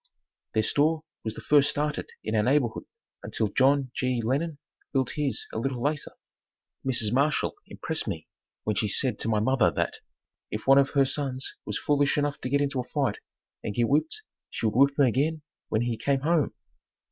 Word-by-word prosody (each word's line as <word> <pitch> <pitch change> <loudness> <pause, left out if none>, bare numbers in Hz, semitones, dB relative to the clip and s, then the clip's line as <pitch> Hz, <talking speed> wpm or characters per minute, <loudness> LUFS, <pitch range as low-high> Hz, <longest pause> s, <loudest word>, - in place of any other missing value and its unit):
Their 110 - +3
store 155 +6 +2 0.2
was 110 0 -4
the - - -8
first 145 -1 +4
started 150 0 -2
in 110 - -3
our 105 - +4
neighborhood 125 0 +1 0.4
until 110 +1 -1
John 135 +2 +3
G. 125 -1 0
Lennon 140 +7 -1 0.3
built 130 -2 +1
his 145 -3 -1
a - - -2
little 130 +1 -2
later. 145 +4 -2 0.7
Mrs. 120 -4 +2
Marshall 140 +3 +2
impressed - - -3
me - - -4 0.4
when 105 - 0
she 110 +1 +1
said 120 +2 +2
to - - -2
my 110 -1 +2
mother 130 +2 +3
that - - -2 0.5
"If 105 - -5
one 135 +1 +7
of 135 -1 +3
her 135 - +6
sons 135 -1 -3
was - - -2
foolish 145 0 +2
enough 145 -1 -1
to 125 - -3
get 140 +2 +2
into 140 -2 0
a - - -1
fight 135 -4 -1 0.4
and 105 - -4
get 120 -1 +2
whipped 320 - +1 0.3
she - - -4
would 110 - +2
whip 140 +2 +4
him 140 - +6
again 145 +6 +1 0.3
when 110 +2 +1
he 120 -1 -1
came 135 +4 0
home." 160 0 +1
135 Hz, 190 wpm, -27 LUFS, 115-145 Hz, 0.7 s, one